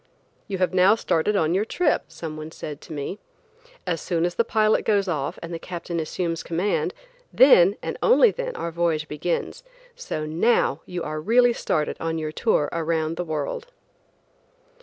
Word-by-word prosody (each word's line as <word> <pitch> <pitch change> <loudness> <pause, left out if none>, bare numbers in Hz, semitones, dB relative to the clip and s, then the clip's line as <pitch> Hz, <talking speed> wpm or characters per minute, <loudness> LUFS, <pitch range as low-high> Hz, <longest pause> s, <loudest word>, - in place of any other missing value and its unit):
"You 195 -3 -3
have 185 0 0
now 185 +3 +5
started 210 -1 0
on 165 -3 +2
your 195 +3 +2
trip," 300 +7 0
someone 155 -1 -7
said 150 -2 -8
to - - -13
me. 155 +7 -5 0.7
"As 170 -3 -2
soon 170 -1 0
as 175 - -1
the 235 - +2
pilot 215 -1 +2
goes 200 -2 +2
off 155 -1 -2
and 170 +1 -6
the 165 - -4
captain 170 -1 -5
assumes 165 +1 -2
command, 175 +5 -1 0.4
then, 200 -8 +6
and - - -4
only 475 -1 +6
then - - -5
our 170 - -4
voyage 165 -2 0
begins, 170 - -3 0.3
so 485 - -4
now 160 - +1
you 180 -1 -4
are 155 0 -4
really 240 +6 +4
started 155 -8 -1
on 165 0 -2
your 155 -1 -3
tour 155 -5 +1
around 165 -1 -1
the 180 - -3
world." 155 - -4
170 Hz, 170 wpm, -24 LUFS, 160-210 Hz, 0.7 s, then